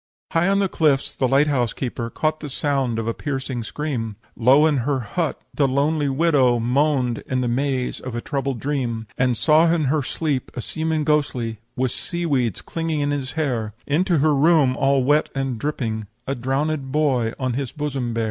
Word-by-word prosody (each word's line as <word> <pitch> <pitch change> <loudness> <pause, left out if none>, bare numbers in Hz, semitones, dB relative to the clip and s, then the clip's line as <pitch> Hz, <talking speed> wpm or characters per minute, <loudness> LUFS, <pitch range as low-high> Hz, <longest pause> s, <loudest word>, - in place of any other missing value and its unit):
"High 170 +2 +2
on 195 0 +3
the 200 -1 +2
cliffs 150 -6 +1
the 130 - +1
light 135 +3 +4
house 125 -6 0
keeper 120 -2 -4
Caught 155 +5 -1
the 150 - -6
sound 135 -4 0
of 115 - -2
a 115 - 0
piercing 135 -3 -3
scream; 115 -3 -3 0.2
Low 130 +6 +5
in 155 -3 +3
her 130 +1 0
hut 155 +9 -2
the 140 - +2
lonely 145 +2 +1
widow 135 -4 +3
Moaned 125 0 +1
in 130 -1 0
the 125 - 0
maze 130 +1 -1
of 130 -2 -6
a - - -1
troubled 135 -2 -2
dream; 125 -5 -2
"And 125 -2 +1
saw 160 +2 +4
in 165 -2 +2
her 155 - +2
sleep 140 -1 -2
a - - -4
seaman 160 +3 -1
ghostly, 130 -7 0 0.2
With 130 -1 0
sea 175 +5 -3
weeds 125 - 0
clinging 165 -2 -2
in 145 0 0
his 135 -2 -3
hair, 120 -9 -2
Into 170 +4 +2
her 150 +1 +3
room, 145 -2 +4
all 135 -1 +2
wet 145 +4 +3
and 135 -4 -2
dripping, 110 -7 -3 0.2
A 135 - -1
drownéd 135 +2 -1
boy 130 -6 +1
on 130 -3 -1
his 135 0 -3
bosom 135 -6 -3
bear. - - 0
135 Hz, 195 wpm, -22 LUFS, 125-150 Hz, 0.2 s, Low